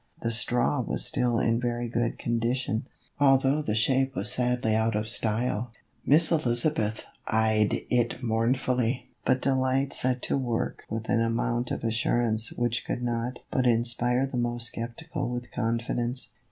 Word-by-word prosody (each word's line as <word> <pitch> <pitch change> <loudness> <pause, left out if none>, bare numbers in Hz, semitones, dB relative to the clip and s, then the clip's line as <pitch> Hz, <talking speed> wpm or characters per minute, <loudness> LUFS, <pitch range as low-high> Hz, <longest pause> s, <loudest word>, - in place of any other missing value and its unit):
The 115 - 0
straw 120 +4 +2
was - - +1
still 125 -5 +1
in 115 0 +1
very 120 0 -2
good 120 0 -1
condition, 120 0 -1 0.3
although 135 +1 +4
the 110 -8 -2
shape 130 +4 +2
was - - +3
sadly 125 -3 +1
out 110 0 +1
of 105 +1 -1
style. 115 +1 -1 0.3
Miss 155 +4 +4
Eliza 140 -3 +3
beth 110 -6 -3 0.2
eyed 110 -1 +2
it 120 +1 0
mournfully, 125 +1 0
but 130 - +2
Delight 135 0 +1
set 125 0 0
to - - 0
work 120 -3 -2
with 110 0 -4
an 115 - +2
amount 120 +1 0
of - - -4
assurance 115 0 +1
which 120 -1 -1
could 125 - -4
not 120 +1 -2
but 130 -1 +1
inspire 120 +2 +2
the 135 -2 -5
most 120 -1 0
skeptical 125 +5 -5
with 120 -1 -5
confidence. 120 +1 -2
120 Hz, 155 wpm, -27 LUFS, 115-125 Hz, 0.3 s, although